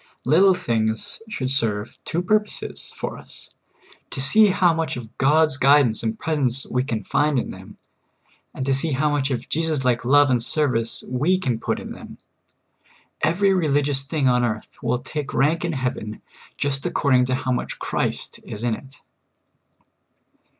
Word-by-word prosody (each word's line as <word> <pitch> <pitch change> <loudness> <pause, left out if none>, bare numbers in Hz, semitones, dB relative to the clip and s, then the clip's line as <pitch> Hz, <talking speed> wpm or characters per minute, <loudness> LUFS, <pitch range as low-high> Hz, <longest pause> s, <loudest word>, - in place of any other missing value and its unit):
Little 180 +8 +5
things 110 - -2
should 130 -11 -3
serve 110 -5 -1
two 170 +2 -1
purposes 210 +3 -2
for - - -5
us - - -13 0.3
— - - -27
to - - -5
see 210 +12 +5
how 185 -3 +3
much 165 -4 -2
of 115 -3 -10
God's 150 +1 +3
guidance 140 -5 +4
and 110 -1 -2
presence 135 -5 0
we 125 0 -1
can 115 -5 -3
find 145 +5 +1
in - - -2
them, - - -12 0.7
and 130 - -5
to 135 - +2
see 140 +3 +1
how 145 +3 +1
much 145 -2 0
of 130 -3 -1
JCvSUs 160 -3 0
like 125 -2 +1
love 145 +2 +5
and 125 -2 +2
ser\' 145 +1 +1
ice 115 0 -1
we 145 +9 +1
can 125 -11 -2
put - - -2
in - - -8
them. - - -10 1.0
Every 190 +6 +2
religious 145 -5 +2
thing 140 0 -1
on 125 -1 +3
earth 110 -2 -3
will - - 0
take 135 +3 -6
rank 155 +6 +2
in 170 -1 -1
heaven 125 -5 -4 0.3
just 140 -1 -1
according 135 -7 +2
to 130 0 0
how 130 0 -2
much 125 - -2
Christ - - -2
is 105 - -7
in 120 -2 +1
it. 135 +5 -10
135 Hz, 170 wpm, -22 LUFS, 125-155 Hz, 1.0 s, Little